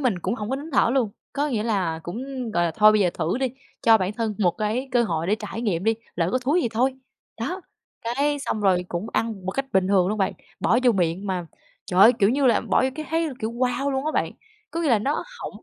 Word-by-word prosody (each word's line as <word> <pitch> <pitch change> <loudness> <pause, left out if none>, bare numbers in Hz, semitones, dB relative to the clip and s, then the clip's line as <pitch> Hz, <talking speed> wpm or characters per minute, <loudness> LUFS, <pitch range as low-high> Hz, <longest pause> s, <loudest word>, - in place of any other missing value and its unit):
mình 240 -10 +1
cũng 225 - -2
hổng 215 -1 -5
có 265 - 0
nín 305 +4 -8
thở 235 - +4
luôn. 235 -6 +2 0.2
Có 290 +2 0
nghĩa 220 -5 -1
là 185 -8 -1
cũng, 250 +6 -5
gọi 175 -2 +2
là, 170 - +1
thôi 215 +2 +6
bây 215 - +3
giờ 180 -3 +3
thử 170 +9 -1
đi, 265 - +1 0.4
cho 225 -1 +6
bản 190 +2 -1
thân 220 -1 -2
một 185 -5 +3
cái 220 +6 -1
cơ 240 - +4
hội 165 -7 -1
để 205 - +3
trải 220 +1 -6
nghiệm 190 -4 -1
đi, 225 0 +3 0.2
lỡ 170 0 +1
có 255 - +2
thúi 285 +8 +1
thì 235 - 0
thôi. 255 +4 +1 0.5
Đó, 360 +11 -3 0.4
cái 280 +5 0
xong 215 - -2
rồi 185 -3 +2
cũng 175 +5 -3
ăn 215 -5 -2
một - - 0
cách 275 +5 -2
bình 190 -1 +2
thường 190 -2 +3
luôn 215 +1 -2
bạn, 190 - +1 0.3
bỏ 240 - +3
vô 245 - +6
miệng 180 +1 -1
mà 180 -3 -2 0.4
trời 180 -1 +1
ơi! 225 +5 +9
Kiểu 200 -1 +4
như 275 +1 +2
là 240 - +4
bỏ - - +1
vô 260 - +2
cái 310 -1 -6
thấy 325 0 +1
kiểu 220 +1 -2
"wow" 255 +3 0
luôn 265 +1 -1
á 310 - 0
bạn, - - 0 0.4
có 335 - -3
nghĩa 315 - +1
là 225 - +5
nó 275 +8 -1 0.2
hổng - - -7
225 Hz, 265 wpm, -24 LUFS, 190-260 Hz, 0.5 s, ơi